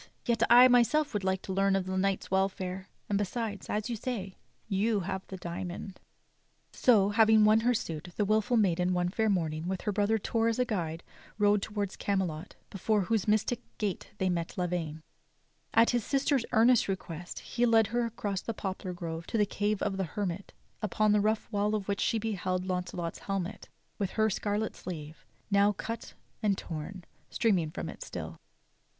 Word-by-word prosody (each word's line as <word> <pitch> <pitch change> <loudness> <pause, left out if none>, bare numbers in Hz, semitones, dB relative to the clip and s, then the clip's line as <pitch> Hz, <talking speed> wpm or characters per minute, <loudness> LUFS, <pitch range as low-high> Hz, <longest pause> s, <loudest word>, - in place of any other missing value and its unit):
Yet 235 -2 +1
I 245 +2 +9
myself 255 +5 +3
would 205 -2 -1
like 190 0 0
to 190 - -4
learn 195 0 +3
of 195 -1 0
the 185 0 -3
knight's 195 0 0
welfare; 190 0 -1 0.2
and 200 -1 +1
besides, 205 0 -3
as 210 0 -1
you 240 - -2
say, 205 -5 -4 0.3
you 210 +1 +1
have 190 +1 -3
the 190 - -7
diamond." 180 +2 -6 0.7
So, 210 -6 +4
having 220 0 +5
won 215 +1 +6
her 245 +2 +2
suit, 165 -5 -4
the 210 - +2
wilful 220 +4 +2
maiden 180 -3 +2
one 175 0 +1
fair 220 +3 +1
morning, 160 -4 -1
with 190 0 -2
her 210 - -1
brother 205 +2 +2
Torre 225 +2 0
as 230 - -1
a 250 - +2
guide, 170 -8 -3 0.3
rode 205 -1 +4
toward 205 -2 -3
Canielot 185 -4 -2 0.2
before 210 +2 +1
whose 210 +1 0
mystic 215 +3 +1 0.2
gate 205 -4 -3
they 190 - 0
met 170 -2 -2
Lavaine. 170 -4 -2 0.7
At 230 +1 +5
his 240 -2 +1
sister's 275 -1 +1
earnest 230 +1 +5
request 175 -3 -5
he 240 0 0
led 225 -1 +5
her 240 0 +2
across 205 -4 -3
the 230 - -4
poplar 190 -2 -4
grove 165 -1 -5
to - - -1
the 210 - +4
cave 205 +1 -1
of 195 -2 -1
the 190 - 0
hermit 190 +2 -4 0.3
upon 215 +1 +2
the 210 0 +4
rough 215 +1 0
wall 210 0 +1
of 205 -2 -3
which 200 -1 -1
she 230 - +2
beheld 185 -4 -2
I.<auncelot's 180 -2 -3
helmet, 195 -1 -4 0.3
with 200 -3 0
her 220 0 +3
scarlet 210 +2 -1
sleeve, 160 -3 -8 0.2
now 200 +1 +4
cut 230 +3 -6 0.3
and 205 -3 +2
torn, 170 +3 -6 0.3
streaming 190 -9 +1
from - - -5
it - - -9
still. - - -6
200 Hz, 180 wpm, -30 LUFS, 185-220 Hz, 0.7 s, I